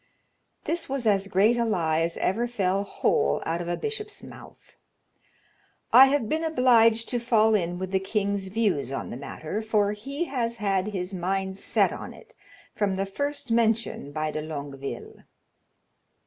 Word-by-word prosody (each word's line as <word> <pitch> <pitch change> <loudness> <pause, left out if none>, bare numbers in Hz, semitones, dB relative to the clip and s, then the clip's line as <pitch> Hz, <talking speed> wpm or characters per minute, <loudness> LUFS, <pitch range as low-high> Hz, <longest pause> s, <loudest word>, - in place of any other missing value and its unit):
This 335 0 -3
was 270 -3 -2
as 200 -2 +2
great 200 +5 +3
a 235 - +2
lie 165 -8 +1
as 165 +1 -1
ever 230 +6 0
fell 195 -4 0
whole 70 - +1
out 165 +2 -1
of 170 - -5
a 175 - -1
bishop's 425 -1 -5
mouth. - - -14 1.2
"I 265 +2 +10
have 270 -4 +1
been 315 +7 -1
obliged 235 -7 +4
to 245 - 0
fall 220 -2 +3
in 175 -4 0
with 185 0 -5
the 190 - +2
king's 200 0 -1
views 190 - 0
on 135 - -4
the - - -5
matter, 155 - -5
for 210 -2 +1
he 275 +10 -4
has 235 -5 -2
had 195 -2 0
his 190 -2 -4
mind 190 +1 -2
set - - +2
on - - -8
it - - -17 0.4
from 200 -2 0
the 195 +1 -1
first 285 +5 -4
mention 225 -9 +1
by 155 +1 -2
de 155 - -3
Longueville." 140 -3 -6
205 Hz, 165 wpm, -26 LUFS, 180-235 Hz, 1.2 s, I